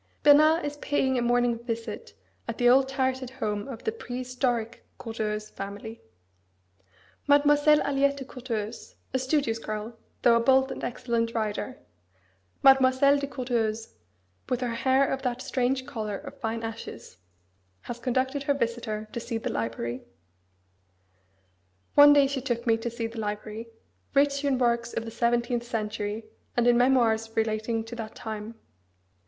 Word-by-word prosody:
Bernard 305 +3 +6
is 290 0 -4
paying 265 -3 0
a - - 0
morning 240 -1 +2
visit 230 -1 -5 0.3
at - - -4
the 245 - +3
old 265 +2 +5
turreted 260 -1 -1
home 210 -4 -3
of 260 -4 -8
the 445 - 0
"prehistoric" 250 - -3
Courteheuse 215 -2 -4
family. 205 +3 -7 1.3
Mademoiselle 290 +1 +5
Aliette 280 0 +1
de 270 - -6
Courteheuse, 235 -4 -5 0.2
a 260 - +1
studious 260 -4 0
girl, 215 +1 -5 0.3
though 240 -2 +6
a - - +4
bold 265 +2 +4
and - - -6
excellent 235 -1 -1
rider 220 +3 -2 0.9
Mademoiselle 270 +1 +6
de 280 - -3
Courteheuse, 230 -4 -2 0.6
"with 250 0 0
her 245 -2 -1
hair 260 +3 +3
of 270 - -2
that 250 -1 -2
strange 260 0 -1
colour 215 -5 -4
of - - -10
fine 225 +1 -3
ashes" 225 - -7 0.6
has 240 0 -7
conducted 260 +3 0
her 285 0 +1
visitor 230 -4 -2
to - - -3
see 230 0 -3
the 225 - -3
library: 115 +2 -3 1.9
One 290 0 +9
day 285 -1 +6
she 275 -1 -2
took 240 -2 -2
me 225 -2 +4
to 225 +1 -3
see 230 0 -4
the 225 0 -6
library, 215 +1 -4 0.5
rich 280 0 +3
in 275 -2 +2
works 235 -1 +1
of 230 - -2
the 225 - -6
seventeenth 240 +1 +1
century 215 -2 -3 0.3
and 240 - +3
in 245 0 +5
memoirs 235 -3 +3
relating 220 +1 0
to 225 +2 -8
that 220 -1 -6
time. 220 0 -6
240 Hz, 150 wpm, -27 LUFS, 225-265 Hz, 1.9 s, One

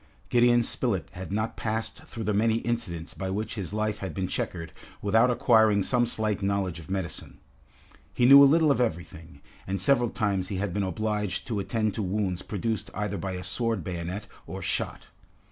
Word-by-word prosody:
Gideon 120 0 +5
Spilett 115 -5 -1
had 95 +1 -8
not 110 +2 -1
passed 110 0 -3
through 115 - -6
the 105 0 0
many 110 +2 +3
incidents 115 -9 -3
by 95 -1 -4
which 105 +3 -3
his 100 -5 -4
life 110 0 -1
had 95 -6 -5
been 95 - -1
checkered 85 -2 -4 0.3
without 115 +4 +3
acquiring 110 -4 +4
some 120 +3 +2
slight 110 -3 -1
knowledge 95 -3 -1
of 80 - -12
medicine. 95 -4 -4 0.7
He 120 - +2
knew 140 +2 +10
a 140 - +8
little 160 0 +4
of 135 - +2
everything, 85 - -4 0.3
and 95 +1 -2
several 120 +3 +3
times 100 -4 -1
he 100 - -4
had 95 -1 -2
been 100 - 0
obliged 105 +1 -2
to 110 -4 -2
attend 110 +1 -1
to 110 - -3
wounds 95 -2 -1
produced 110 +2 -3
either 105 -1 -2
by 95 -1 -3
a 90 0 -5
sword 115 -5 -1
bayonet 90 +3 -4 0.2
or - - -6
shot. - - -2
105 Hz, 185 wpm, -27 LUFS, 95-115 Hz, 0.7 s, knew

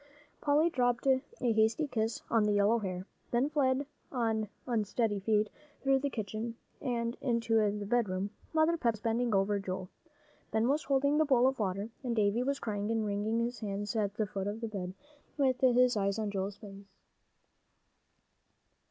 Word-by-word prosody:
Polly 305 +3 +3
dropped 245 -2 +1
a 265 -1 +4 0.2
hasty 225 +3 +2
kiss 225 -3 -2
on 225 -2 +3
the 210 - +2
yellow 205 +3 +4
hair, 185 -3 -4 0.2
then 250 +5 +1
fled 275 -2 +2 0.3
on 225 -4 0 0.2
unsteady 220 -2 0
feet 210 +1 +2 0.4
through 270 0 +4
the 280 +1 -1
kitchen 220 0 -4 0.3
and 235 -2 -1
into 230 -2 0 0.2
the 205 - -4
bedroom. 200 -3 0 0.2
Mother 320 +1 +3
Pepper 235 -7 +2
was 215 - -14
bending 230 0 +1
over 200 +1 +2
Joel. 185 -1 -4 0.6
Ben 220 +1 +1
was 285 +3 +1
holding 280 +2 +2
the 315 - +4
bowl 255 -4 +4
of 265 -1 +2
water, 200 +2 -2
and 240 -2 -1
Davie 210 +2 +2
was 275 +2 0
crying 205 -3 -3
and 225 -1 0
wringing 210 +2 0
his 240 +1 -2
hands 205 +1 -3
at 205 -2 0
the 215 - 0
foot 195 -1 -4
of 210 +2 -4
the 230 - -2
bed, 190 -4 -5 0.4
with 260 -3 +2
his 250 -1 +5
eyes 200 0 0
on 215 -2 -2
Joel's 195 0 -3
face. 200 -1 -11
225 Hz, 170 wpm, -32 LUFS, 205-250 Hz, 0.6 s, his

